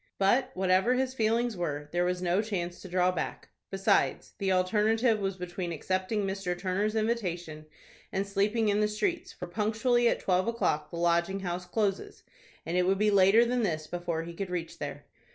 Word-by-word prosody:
But, 245 +7 +3
whatever 190 +6 +3
his 260 0 0
feelings 230 0 +1
were, 150 -5 -3
there 175 0 +1
was 180 0 -1
no 180 +3 +2
chance 180 -5 -4
to - - -9
draw 180 0 +2
back. 180 - -5 0.2
Besides, 195 0 +1
the 195 -1 0
alternative 215 +5 +2
was 195 -1 -2
between 180 -1 -4
accepting 185 +6 -1
Mr. 190 -2 -2
Turner's 195 +4 -1
invitation, 175 -9 -2 0.4
and 195 0 -1
sleeping 210 +3 +1
in 205 0 +2
the 210 - +3
streets, 330 - -2
for 180 - -7
punctually 225 +6 +1
at - - 0
twelve 185 +2 +1
o'clock 155 -10 0
the 170 - -7
Lodging 170 +3 +1
House 180 -1 -4
closes, 200 0 -2 0.4
and 165 - -3
it 180 0 +2
would 195 +1 +3
be 210 +1 +3
later 200 +4 +6
than 245 +1 0
this 160 -7 -1
before 170 -1 -3
he 170 +1 -8
could 190 +2 -5
reach 175 -2 -4
there. - - -6
190 Hz, 185 wpm, -29 LUFS, 175-215 Hz, 0.4 s, later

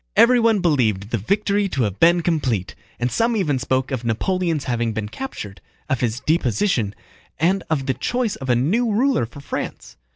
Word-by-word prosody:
Everyone 230 -4 +5
believed 115 - +1
the 115 - 0
victory 200 - +1
to 135 -8 0
have 100 -2 -2
been 170 +1 +5
complete, 130 - 0 0.3
and 120 +1 0
some 230 - +1
even 150 -9 +1
spoke 130 +1 -1
of 130 -3 -2
Napoleon's 165 - 0
having 120 -2 -1
been 105 -1 -3
captured, 105 - -7 0.3
of 130 - +1
his 120 -1 -1
deposition, 125 - +1 0.4
and 185 +5 +2
of 145 -4 0
the 130 - +1
choice 245 - -1
of 135 -2 -7
a 120 - +4
new 210 - +1
ruler 240 - +2
for 140 +4 -12
France. - - -6
140 Hz, 175 wpm, -21 LUFS, 120-195 Hz, 0.4 s, Everyone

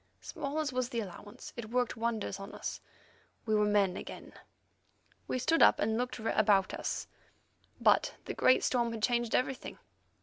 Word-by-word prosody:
Small 280 +2 -5
as 305 -4 -1
was 250 -1 -1
the 235 - -2
allowance, 205 0 -8
it 230 -3 -6
worked 245 0 0
wonders 225 -3 -2
in 195 +1 -8
us; - - -5 0.6
we 220 - 0
were 210 0 +4
men 200 -3 +3
again. - - -8 0.9
We - - -1
stood 325 +6 +2
up - - +7
and 220 +1 +1
looked 250 +2 -2
about 210 -3 +2
us, - - -3 0.7
but - - +3
the - - -4
great 255 - +4
storm 240 -2 +1
had 220 -2 -6
changed 240 -1 +1
everything. 255 +1 -1
235 Hz, 165 wpm, -32 LUFS, 210-250 Hz, 0.9 s, up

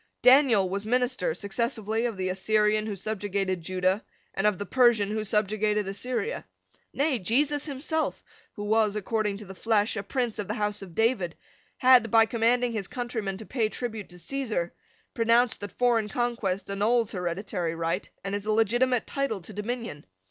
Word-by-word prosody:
Daniel 250 -7 +6
was 200 +2 -3
minister 245 -6 0
successively 220 +2 -1
of 225 -4 -5
the 185 0 -1
Assyrian 215 +3 +2
who 210 - -3
subjugated 195 -2 -2
Judah, 185 +4 0 0.3
and 195 +2 +1
of 210 -3 +1
the 205 - -4
Persian 235 -5 +3
who 215 0 -1
subjugated 210 0 0
Assyria. 250 - -3 0.5
Nay, 280 -3 0
Jesus 285 - +1
himself, 310 +3 -2 0.3
who 205 - -6
was, 215 0 +2
according 210 -1 -1
to 210 - -10
the 190 - -9
flesh, 215 +2 +1
a 200 - -2
prince 235 +2 -2
of 205 - -3
the - - -2
house 210 0 -1
of 180 -4 -10
David, 225 -7 +1 0.4
had, 250 -3 +6
by 225 +1 +6
commanding 235 +2 +2
his 210 -5 -3
countrymen 225 -6 -3
to 220 - -9
pay 225 -3 0
tribute 220 -3 -5
to 180 - -13
Caesar, 220 -5 -3 0.4
pronounced 230 +1 +3
that 205 -2 -5
foreign 235 -4 +1
conquest 230 -5 -1
annuls 220 +3 +2
hereditary 180 -1 -3
right 165 +3 -2
and 195 - -4
is 205 +1 -3
a - - +2
legitimate 240 +3 +2
title 275 -7 -2
to 190 +5 -11
dominion. 210 -6 -4
215 Hz, 170 wpm, -27 LUFS, 195-240 Hz, 0.5 s, Daniel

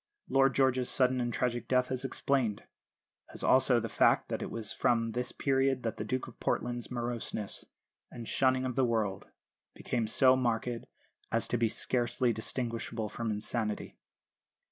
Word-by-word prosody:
Lord 135 -1 +4
George's 130 -2 +2
sudden 130 -1 +2
and 120 0 -1
tragic 120 0 -1
death 125 0 +2
is 130 0 -1
explained; 130 -5 0 0.7
as - - -5
also - - +5
the - - -3
fact - - +3
that - - -2
it - - -4
was 115 -2 -1
from 115 -1 +1
this 125 +2 -2
period 135 -1 +1
that 115 -2 -2
the - - -3
Duke 130 +4 -2
of 120 - -13
Portland's 120 -1 -2
moroseness 120 -4 -3 0.4
and 115 -2 -8
shunning 130 0 +2
of 125 -2 -2
the 135 - +3
world 110 -5 0 0.5
became 115 -3 -2
so 130 +3 +5
marked 120 -2 0 0.6
as 115 0 0
to - - 0
be 115 -1 +2
scarcely 120 +1 0
distinguishable 115 -1 -3
from 115 +1 -3
insanity. 105 0 -2
120 Hz, 160 wpm, -31 LUFS, 115-130 Hz, 0.7 s, also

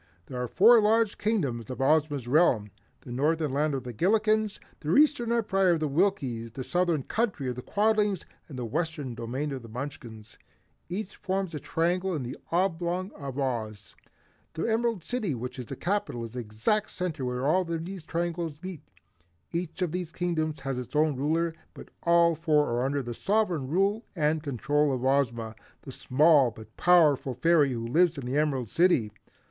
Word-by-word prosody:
There 125 -1 -5
are 125 - -2
four 225 - +6
large 220 0 +2
Kingdoms 140 - -1
in 130 - -6
Ozma's 145 -2 +2
realm, 125 - +3 0.3
the - - -10
Northern 150 +3 0
Land 150 +1 +1
of 130 - -4
the 125 -1 -6
Gillikens, 215 - +1 0.2
the 155 +2 0
Eastern 285 -6 +4
Empire 195 -6 +2
of 165 - 0
the 155 - 0
Winkies, 135 - 0
the 130 - -5
Southern 175 -2 0
Country 210 - -1
of 125 - -2
the 125 - -6
Quadlings 210 - +1 0.2
and 135 - -8
the 125 - -3
Western 150 0 -3
domain 125 +6 -4
of 135 -2 -5
the 115 - -12
Munchkins. 115 -3 -8 0.5
Each 195 +2 -4
forms 190 -2 -2
a 150 - -4
triangle 175 +4 0
in 145 - -3
the 125 +1 -5 0.2
oblong 180 +1 0
of 140 -2 -7
Oz. 110 -7 -3 0.6
The 160 - -3
Emerald 230 -4 0
City 220 - -2
which 125 +3 -6
is 125 - -6
the 135 - -5
capital, 175 - -2
is 115 +1 -8
in 125 - -2
the - - -9
exact 115 - 0
center 170 -6 -4
where 125 +1 -2
all 180 +6 +3
these 170 +1 -5
triangles 170 -2 -3
meet. 185 -5 -6 0.7
Each 175 +1 -3
of 175 - -1
these 180 -1 -4
Kingdoms 160 -4 -2
has 135 -2 -3
its 125 +1 -8
own 150 -1 +3
ruler, 160 +5 0 0.2
but - - -11
all 170 0 +4
four 155 -2 +2
are 120 +1 0
under 140 +1 -1
the 120 -1 -5
sovereign 185 - 0
rule 195 - +1
and 155 -1 +1
control 145 +1 0
of 130 0 -2
Ozma, 120 -5 +1 0.3
the 135 - -8
small 145 +1 +4
but 110 -1 -13
powerful 150 -7 +4
fairy 150 +1 +3
who 115 -1 -4
lives 165 +6 +3
in 135 - -5
the 125 +2 -2
Emerald 135 -7 0
City. 165 -12 +3
155 Hz, 185 wpm, -28 LUFS, 130-180 Hz, 0.7 s, four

